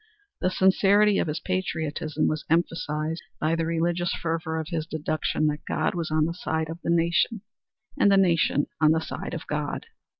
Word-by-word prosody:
The 185 - +1
sincerity 195 +2 +4
of - - 0
his 150 - -2
patriotism 160 -4 -2
was 155 -1 -1
emphasized 165 -1 0 0.2
by 155 +1 +1
the 165 -1 -1
religious 170 +1 0
fervor 160 -1 -2
of 160 - -5
his 165 -2 -3
deduction 155 0 -1
that 150 0 -1
God 155 - 0
was 170 -2 -3
on 155 0 +2
the 165 - -2
side 160 -2 -2
of 165 - -7
the - - -2
nation, 170 +6 +2 0.6
and 200 - +5
the 195 - +5
nation 170 -6 +3 0.2
on 155 0 +6
the 160 - +2
side - - -5
of 165 - -6
God. 150 -1 -3
165 Hz, 180 wpm, -26 LUFS, 155-175 Hz, 0.6 s, on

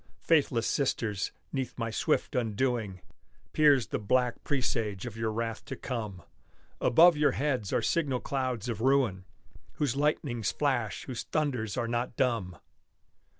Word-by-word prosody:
faithless 135 -8 +3
sisters, 110 -7 0 0.2
'neath 135 -2 -3
my 115 -2 -2
swift 150 +6 0
undoing, 115 -4 -1 0.5
Peers 145 -5 +5
the - - -1
black 125 +3 +1
presage 115 -7 -1
of 120 -3 -6
your 115 -1 -1
wrath 115 0 -3
to - - -6
come; 105 -8 -5 0.6
Above 170 +6 +6
your 150 0 +3
heads 130 -8 -1
are - - +1
signal 140 -7 +1
clouds 130 -5 -2
of 115 -3 -3
ruin, 125 -8 +2 0.5
Whose 140 -4 -1
lightnings 140 -7 0
flash, 130 -8 -1
whose 125 -3 -5
thunders 125 -8 -2
are 120 -1 0
not 120 +1 -2
dumb! 115 -9 0
120 Hz, 140 wpm, -29 LUFS, 110-135 Hz, 0.6 s, Above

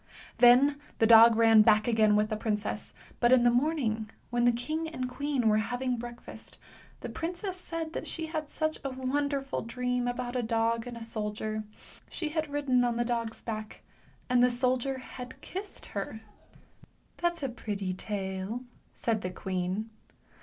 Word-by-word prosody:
Then 265 +4 +6 0.2
the 225 - +4
dog 225 0 +9
ran 225 -1 +7
back 215 0 +4
again 220 -3 +4
with 210 0 +2
the 215 - -1
princess, 210 -1 -3 0.2
but 240 0 +4
in 255 -2 +6
the 240 - +5
morning, 240 -5 0 0.2
when 240 0 +2
the 245 - +6
king 310 +7 -3
and 255 -6 -4
queen 275 -1 -1
were 215 0 +4
having 245 +3 -1
breakfast, 240 0 -9 0.4
the - - -4
princess 355 +3 -4
said 330 -3 -5
that - - -4
she 325 - -4
had 320 - -10
had 305 -2 -3
such 310 +1 -2
a 275 - -2
wonderful 275 +1 -1
dream 250 +1 -2
about 245 0 -3
a 250 - +1
dog 230 0 0
and 240 -1 -6
a 230 - -7
soldier. 215 -1 -3 0.4
She 315 - -4
had 310 -1 -2
ridden 280 -4 +2
on 240 -1 +1
the 240 - +1
dog's 230 -2 -3
back, 215 -2 -6 0.4
and 250 -1 +3
the 250 - +6
soldier 255 +2 0
had 255 0 -9
kissed 390 +2 -7
her. 210 +2 -5 0.5
" - - -29
That's 345 -2 -1
a 270 - 0
pretty 205 -5 -3
tale," 190 +3 -4 0.3
said 225 -3 -1
the 180 - -3
queen. 185 +4 -3
240 Hz, 175 wpm, -29 LUFS, 220-275 Hz, 0.5 s, dog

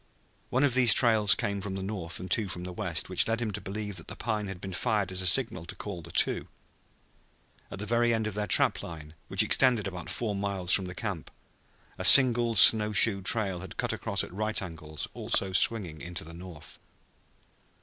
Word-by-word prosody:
One 130 +3 0
of 140 -4 +2
these 125 -3 +5
trails 110 -5 +4
came 100 0 -4
from 95 0 -5
the 95 - -5
north 95 -4 -2
and 90 0 -9
two 110 -3 +1
from 90 0 -6
the 90 0 -7
west, - - -3
which - - 0
led 115 0 -1
him 115 -3 -3
to - - -6
believe 105 0 -6
that 80 - -8
the - - -8
pine 110 -3 -4
had 95 -2 -8
been 95 0 -8
fired 105 -1 -1
as 95 0 0
a 95 - +1
signal 95 -5 0
to - - -6
call 100 -4 -8
the 85 - -12
two. - - +1 1.2
At - - -9
the 105 - -6
very 120 +2 +1
end 110 -1 -1
of 110 - -4
their 105 +1 -4
trap - - +4
line, 80 -2 -10
which - - +1
extended 125 -5 +2
about 90 -3 -7
four 110 -3 -3
miles 100 -3 -3
from 90 -1 +4
camp, 100 -6 -6 0.7
a - - -4
single 120 -3 +7
snow 105 +1 +6
shoe 105 -2 +4
trail 95 -2 0
had 95 0 -11
cut - - -2
across 100 -2 -2
at - - -10
right 110 +2 -2
angles, 80 -4 -7
also 95 -1 -2
swinging 95 -6 0
into 85 -1 -7
the 85 +1 -12
north. 85 -2 -9
100 Hz, 210 wpm, -27 LUFS, 90-110 Hz, 1.2 s, single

